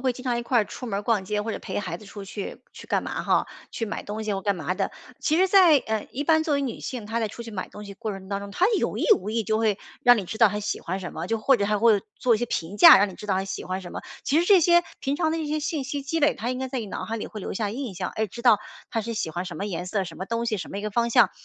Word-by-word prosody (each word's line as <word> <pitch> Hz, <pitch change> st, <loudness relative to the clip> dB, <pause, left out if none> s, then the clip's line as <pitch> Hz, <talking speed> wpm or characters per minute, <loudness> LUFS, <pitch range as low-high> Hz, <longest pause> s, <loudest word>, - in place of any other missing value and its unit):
会 255 Hz, -1 st, +2 dB
经 250 Hz, +2 st, -11 dB
常 245 Hz, -2 st, +1 dB
一 240 Hz, -, -2 dB
块 240 Hz, 0 st, +2 dB
儿 215 Hz, -, +3 dB
出 250 Hz, -, -8 dB
门 200 Hz, -3 st, -2 dB
儿 -, -, -4 dB
逛 210 Hz, -3 st, +1 dB
街 210 Hz, +2 st, -1 dB
或 220 Hz, +1 st, -3 dB
者 -, -, -4 dB
陪 -, -, -4 dB
孩 205 Hz, -, -4 dB
子 215 Hz, -, -14 dB
出 200 Hz, 0 st, -9 dB
去 195 Hz, +1 st, -6 dB
去 -, -, -12 dB
干 -, -, +2 dB
嘛 -, -, -3 dB
哈？ -, -, +2 dB, 0.2 s
去 225 Hz, -, -3 dB
买 205 Hz, -, -4 dB
东 215 Hz, +1 st, -5 dB
西 210 Hz, -, -1 dB
或 195 Hz, -, -4 dB
干 200 Hz, -2 st, +1 dB
嘛 175 Hz, +3 st, -2 dB
的。 -, -, -1 dB, 0.3 s
其 310 Hz, -, +2 dB
实 375 Hz, +2 st, +5 dB
在 370 Hz, -5 st, +7 dB
呃， 220 Hz, -3 st, -3 dB
一 285 Hz, +3 st, -3 dB
般 315 Hz, 0 st, +4 dB
作 310 Hz, -3 st, 0 dB
为 280 Hz, -, +1 dB
女 255 Hz, -, -4 dB
性， 240 Hz, -5 st, -5 dB
她 230 Hz, +1 st, -2 dB
在 220 Hz, -, 0 dB
出 235 Hz, +3 st, -9 dB
去 225 Hz, -, -8 dB
买 185 Hz, -, -4 dB
东 210 Hz, -, -10 dB
西 200 Hz, -, -8 dB
的 -, -, -17 dB
过 215 Hz, -, -2 dB
程 190 Hz, -1 st, -8 dB
当 200 Hz, 0 st, -2 dB
中， 200 Hz, -, -8 dB
她 360 Hz, -, +2 dB
有 -, -, -1 dB
意 -, -, 0 dB
无 210 Hz, -, -5 dB
意 225 Hz, -1 st, -1 dB
就 215 Hz, -, +1 dB
会 215 Hz, -3 st, +1 dB, 0.2 s
让 245 Hz, -2 st, +7 dB
你 195 Hz, -, -2 dB
知 220 Hz, -, -6 dB
道 225 Hz, -2 st, +6 dB
她 210 Hz, +1 st, -3 dB
喜 210 Hz, -, -3 dB
欢 185 Hz, +3 st, -3 dB
什 180 Hz, -, -6 dB
么， 165 Hz, +3 st, -5 dB
就 225 Hz, -, 0 dB
或 260 Hz, +4 st, +4 dB
者 200 Hz, -, 0 dB
还 210 Hz, 0 st, +1 dB
会 215 Hz, -3 st, +4 dB, 0.2 s
做 240 Hz, -2 st, +3 dB
一 -, -, 0 dB
些 240 Hz, -, -1 dB
评 175 Hz, -1 st, -3 dB
价， 205 Hz, -, +10 dB
让 205 Hz, +1 st, +3 dB
你 185 Hz, -, -9 dB
知 -, -, -11 dB
道 190 Hz, -, +2 dB
她 190 Hz, +1 st, 0 dB
喜 190 Hz, -1 st, -5 dB
欢 185 Hz, +1 st, -3 dB
什 175 Hz, -, -9 dB
么。 -, -, -5 dB, 0.2 s
其 305 Hz, +4 st, +3 dB
实 -, -, +1 dB
这 385 Hz, -2 st, +6 dB
些 345 Hz, +1 st, +5 dB, 0.2 s
平 275 Hz, 0 st, -1 dB
常 320 Hz, 0 st, +1 dB
的 325 Hz, -, -1 dB
一 315 Hz, -, -3 dB
些 305 Hz, +1 st, -1 dB
信 300 Hz, -2 st, -2 dB
息 280 Hz, +1 st, -3 dB
积 325 Hz, +4 st, -2 dB
累， 295 Hz, 0 st, +3 dB
它 235 Hz, +2 st, -3 dB
应 255 Hz, -, -3 dB
该 265 Hz, -, -2 dB
在 260 Hz, -1 st, -3 dB
你 215 Hz, -, -5 dB
脑 -, -, -5 dB
海 225 Hz, +1 st, -3 dB
里 -, -, -5 dB
会 215 Hz, -, -8 dB
留 200 Hz, -, -5 dB
下 210 Hz, -1 st, -1 dB
印 240 Hz, -4 st, -5 dB
象， -, -, -3 dB
哎 220 Hz, -, +1 dB
知 235 Hz, +4 st, -9 dB
道 235 Hz, -5 st, +6 dB, 0.3 s
她 225 Hz, -, 0 dB
是 230 Hz, +2 st, -4 dB
喜 165 Hz, -6 st, -2 dB
欢 175 Hz, +3 st, -4 dB
什 180 Hz, -, -7 dB
么 200 Hz, -, -3 dB
颜 180 Hz, -3 st, -4 dB
色、 195 Hz, +1 st, -1 dB
什 180 Hz, -, -8 dB
么 190 Hz, -, -5 dB
东 230 Hz, +2 st, -1 dB
西、 220 Hz, -2 st, 0 dB
什 -, -, -6 dB
么 200 Hz, -, -3 dB
一 -, -, -5 dB
个 215 Hz, -, -3 dB
方 235 Hz, +2 st, +1 dB
向， -, -, +5 dB
220 Hz, 375 characters per minute, -25 LUFS, 200-255 Hz, 0.3 s, 价